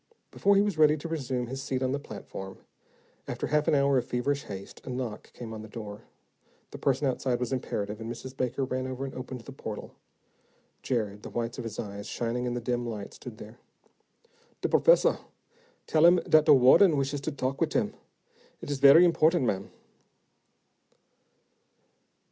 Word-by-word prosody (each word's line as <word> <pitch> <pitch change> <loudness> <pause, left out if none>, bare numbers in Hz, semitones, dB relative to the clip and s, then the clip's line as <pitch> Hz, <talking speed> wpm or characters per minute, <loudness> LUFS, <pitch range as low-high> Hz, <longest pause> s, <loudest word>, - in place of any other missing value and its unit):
Before 200 0 +3
he 200 - +5
was 200 -6 -2
ready 155 0 +5
to 155 - -6
resume 135 -6 -2
his 135 +3 -6
seat 130 -1 -2
on 130 - 0
the 140 - -1
platform, 95 -5 -8 0.7
after - - -3
half 150 +1 +1
an 160 - +4
hour 140 -1 +3
of - - -5
feverish 140 +3 -1
haste, 100 -1 -9
a - - -8
knock 125 -4 -5
came 115 -2 -8
on 110 - -7
the 110 - -9
door. 105 0 -8 0.7
The - - -8
person 135 +1 +1
outside 130 -1 0
was 125 +1 -2
imperative, 105 -4 -3
and 115 +1 -5
Mrs. 130 +2 -8
Baker 130 +1 -1
ran 130 0 -3
over 130 +1 -4
and 135 - -7
opened 130 -1 -7
the 135 - -11
portal. 110 -5 -7 0.9
Jared, 105 -5 -2
the - - -8
whites 115 +1 -3
of - - -4
his 110 -2 -6
eyes 100 -1 -6
shining 120 +1 -2
in 120 - -2
the - - -1
dim 120 +1 -1
light, 110 -4 -6
stood 120 -4 -10
there. 110 +3 -12 1.0
"De - - +1
professah - - +4 0.7
tell 155 0 +2
him 175 - +7
dat 155 -1 +5
de - - +8
wahden 145 +6 +6
wishes 140 +1 -1
to 155 - -3
talk 135 -1 -3
with - - +1
him. - - 0 0.7
It - - -6
is 140 - -2
very 140 +6 +8
important, 165 -3 +3
ma'am." 100 -4 -1
130 Hz, 185 wpm, -28 LUFS, 115-140 Hz, 1.0 s, de